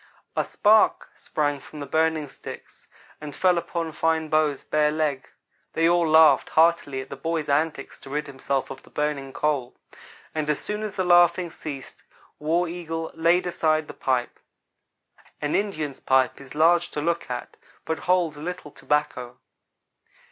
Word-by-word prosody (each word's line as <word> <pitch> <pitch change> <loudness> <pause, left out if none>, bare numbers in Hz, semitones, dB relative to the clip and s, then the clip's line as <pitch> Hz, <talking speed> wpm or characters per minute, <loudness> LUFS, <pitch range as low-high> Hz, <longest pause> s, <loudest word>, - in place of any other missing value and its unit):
A - - +2
spark 215 +1 +3
sprang 145 -2 -2
from 150 +3 -12
the 145 - -5
burning 160 0 +1
sticks, 130 - -11 0.3
and 150 -1 -7
fell 180 -2 +3
upon 170 -1 -4
Fine 160 0 0
Bow's 155 -2 +1
bare 150 0 +2
leg. 150 -4 -2 0.4
They 165 0 +3
all 170 -1 +3
laughed 160 0 +6
heartily 160 -5 +2
at 130 - -11
the - - -4
boy's 160 +2 -2
antics 145 0 -1
to - - -12
rid 150 +2 -2
himself 135 -1 -3
of 135 - -8
the - - -19
burning 150 -2 -2
coal; 140 -4 -1 0.6
and 155 -1 -2
as 150 - +2
soon 210 0 -4
as 210 -2 -5
the 185 - 0
laughing 175 -1 +4
ceased 140 -5 -8 0.4
War 165 +4 +1
Eagle 165 -1 -5
laid 170 +3 +2
aside 155 -3 +1
the - - -8
pipe. 125 -2 -1 1.0
An 150 0 -2
Indian's 155 -9 -2
pipe 130 0 +2
is 135 +1 -12
large 170 +3 +4
to - - -2
look 170 0 -1
at, 125 -1 -5 0.3
but 160 - -2
holds 175 -4 +2
little 175 0 -6
tobacco. 140 -5 -2
155 Hz, 160 wpm, -25 LUFS, 145-170 Hz, 1.0 s, laughed